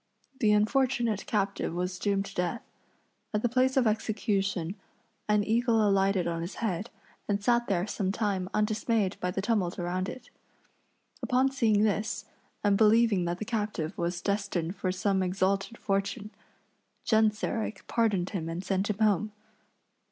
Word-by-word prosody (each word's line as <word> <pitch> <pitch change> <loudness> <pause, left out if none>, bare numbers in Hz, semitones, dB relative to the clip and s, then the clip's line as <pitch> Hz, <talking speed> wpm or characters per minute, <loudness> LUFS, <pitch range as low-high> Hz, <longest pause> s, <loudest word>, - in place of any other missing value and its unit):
The 215 -3 +4
unfortunate 235 0 +1
captive 200 -5 -1
was 180 +1 -2
doomed 200 -1 0
to 195 - -9
death. 180 +6 -2 0.7
At 210 - 0
the - - +4
place 260 +2 +2
of 260 - +4
execution 200 -5 0 0.6
an 210 0 +4
eagle 225 0 +2
alighted 195 -2 +2
on 170 -1 -2
his 170 +3 -5
head 215 -1 -2 0.4
and 200 0 -1
sat 240 +1 +2
there 180 -2 +1
some 195 -2 -1
time 195 -3 -1
undismayed 210 -1 0
by 180 - -1
the 190 +1 -3
tumult 205 -5 0
around 180 +2 -2
it. 255 - -10 0.9
Upon 260 +1 +2
seeing 220 -6 +3
this, 210 0 0 0.4
and 205 -1 +3
believing 220 -3 +4
that 175 0 -2
the 215 - -5
captive 205 -7 -2
was 175 -2 -2
destined 195 -4 -1
for 185 - -1
some 190 +1 0
exalted 195 +4 0
fortune, 200 +1 -2 0.7
Genseric 220 -1 +1
pardoned 210 -6 +1
him 165 -6 -3
and 170 +3 -4
sent 195 +1 0
him 210 - -1
home. 215 -1 +2
205 Hz, 150 wpm, -29 LUFS, 185-220 Hz, 0.9 s, The